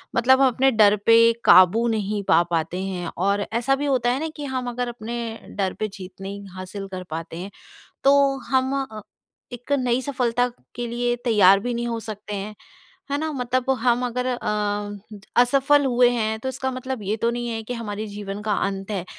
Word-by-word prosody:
मतलब 260 +3 +4
हम 270 - +6
अपने 265 +2 +3
डर 210 -3 +5
पे 230 - +7 0.3
काबू 185 +6 +6
नहीं 210 -2 -1
पा 170 -2 +4
पाते 170 +3 -1
हैं 185 -3 -4
और 200 +3 +1
ऐसा 245 +4 +2
भी 285 +2 -3
होता 255 -4 +1
है 260 - -1
ना 320 - -2
कि 295 -2 -6
हम 250 -1 -2
अगर 245 +1 -3
अपने 235 0 -6 0.4
डर 190 -2 0
पे 215 - 0
जीत 190 -1 -11
नहीं 200 +1 -6
हासिल 190 +2 -7
कर 185 -1 -5
पाते 165 +1 -6
हैं, 190 +3 -7 0.5
तो 275 0 +4
हम 260 +1 +1
अ, 215 -4 -10 0.5
एक 245 +3 -9
नई 250 0 +1
सफलता 245 -3 0 0.3
के 240 0 -3
लिए 240 +1 -1
तैयार 200 -4 +6
भी 245 +4 -3
नहीं 240 0 -2
हो 230 -1 -2
सकते 210 -1 -7
हैं। 205 +2 -5 0.6
है 285 - +1
ना? 315 +1 -2
मतलब 255 -1 -2
हम 245 +1 +2
अगर 250 +1 -2
अ, 210 -4 -2 0.5
असफल 275 +3 +3
हुए 245 -1 +4
हैं, 220 -2 -1
तो 260 - -3
इसका 265 0 -3
मतलब 255 -1 -5
ये 205 +2 -1
तो 230 +1 +1
नहीं 240 0 -3
है 225 -1 -3
कि 245 - -5
हमारे 215 -2 -5
जीवन 205 0 -6
का 210 -1 0
अंत 195 0 -3
है, 190 -4 -3
230 Hz, 200 wpm, -23 LUFS, 205-250 Hz, 0.6 s, पे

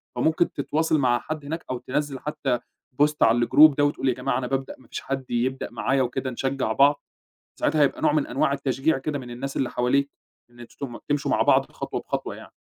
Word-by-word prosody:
فممكن 160 +2 +2
تتواصل 155 +3 0
مع 120 -3 +2
حد 155 -1 -6
هناك، 160 +3 -5
أو 130 - -2
تنزّل 135 +2 -3
حتى 140 -3 -2 0.4
Post 150 +1 +4
على 120 +1 +4
الGroup 155 -1 +7
ده 145 - +3
وتقول، 145 -2 0
يا - - +2
جماعة 125 +1 -1
أنا 125 - -2
بابدأ، 135 +1 -3
ما - - -20
فيش - - -6
حد 135 -1 -4
يبدأ 130 +2 -1
معايا 135 0 0
وكده، 130 +1 -2
نشجع 130 -1 -2
بعض، 140 +5 +4 0.6
ساعتها 155 +1 +1
هيبقى 140 - +1
نوع - - +4
من 150 -2 +1
أنواع 140 - +1
التشجيع 140 +2 0
كده 145 +2 -3
من 125 -2 -9
الناس 135 +3 -5
اللي 130 - 0
حواليك، 140 +3 +1 0.4
إن 120 0 -18
أنتم 120 - -13 0.2
تم - - -7
تمشوا 145 -1 0
مع - - +3
بعض - - +3
خطوة - - -4
بخطوة - - -4
يعني. - - -13
135 Hz, 215 wpm, -25 LUFS, 125-145 Hz, 0.6 s, الGroup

